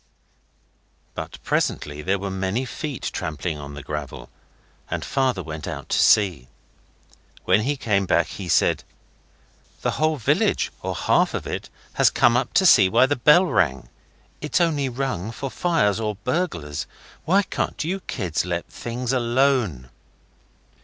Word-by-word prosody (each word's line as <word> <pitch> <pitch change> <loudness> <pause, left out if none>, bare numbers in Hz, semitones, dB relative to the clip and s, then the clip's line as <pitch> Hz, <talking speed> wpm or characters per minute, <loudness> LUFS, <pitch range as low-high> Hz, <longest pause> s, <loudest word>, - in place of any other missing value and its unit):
But - - -6
presently 75 0 -1
there 95 +5 0
were 100 0 -4
many 95 +6 -1
feet 140 +1 -5
trampling 75 +1 -3
on 70 0 -8
the 75 - -8
gravel, 75 -1 -6 0.6
and - - -3
Father 130 -8 0
went 80 -1 -7
out - - -6
to - - +1
see. 90 - +4 1.0
When 95 +3 +4
he 140 +5 -1
came 100 -6 0
back 85 - +3
he 95 +1 -8
said - - +2 1.0
'The - - +1
whole 155 0 +1
village, 120 - +1
or - - -3
half - - +2
of - - -4
it, - - -5 0.2
has - - +4
come 120 0 +3
up 125 - 0
to 190 - +4
see 100 - +7
why 130 - +5
the 145 +2 0
bell 150 +8 +5
rang. 65 - 0 0.5
It's 150 +4 0
only 150 -6 +1
rung 125 -6 -3
for 135 +4 -5
fire 165 - +1
or 105 -1 -2
burglars. 105 - -3 0.4
Why 195 +4 +4
can't - - -3
you 185 +5 -2
kids 95 - -2
let 85 -1 -3
things 120 +2 -4
alone? 120 - +1
110 Hz, 150 wpm, -23 LUFS, 85-135 Hz, 1.0 s, see